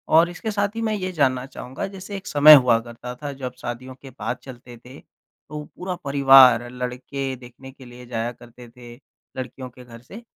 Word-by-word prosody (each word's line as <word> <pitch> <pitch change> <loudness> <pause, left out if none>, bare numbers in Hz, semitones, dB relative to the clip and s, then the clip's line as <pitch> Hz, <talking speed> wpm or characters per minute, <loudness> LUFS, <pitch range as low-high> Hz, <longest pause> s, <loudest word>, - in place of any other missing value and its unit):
और 165 +2 +6
इसके 200 +5 -5
साथ 205 +1 -1
ही 230 - -3
मैं 220 -1 -1
ये 185 -2 -4
जानना 130 -6 0
चाहूँगा 130 +1 -7
जैसे 195 +1 -9
एक 195 - -11
समय 150 +1 +8
हुआ 125 -4 +4
करता 120 +1 -9
था 145 -1 -4
जब 130 -2 -6
शादियों 130 +2 -7
के 135 - -11
बाद - - -3
चलते 120 -2 -12
थे, 125 +4 -14 0.5
तो 150 0 -6
पूरा 180 0 -5
परिवार 135 -4 +6
लड़के 125 +2 -5
देखने 125 +1 -13
के 130 0 -16
लिए 125 0 -13
जाया 120 0 -3
करते 120 0 -15
थे, 120 0 -13 0.4
लड़कियों 130 0 -7
के 125 +1 -15
घर 115 -1 -13
से 205 - -12
130 Hz, 195 wpm, -22 LUFS, 125-150 Hz, 0.5 s, समय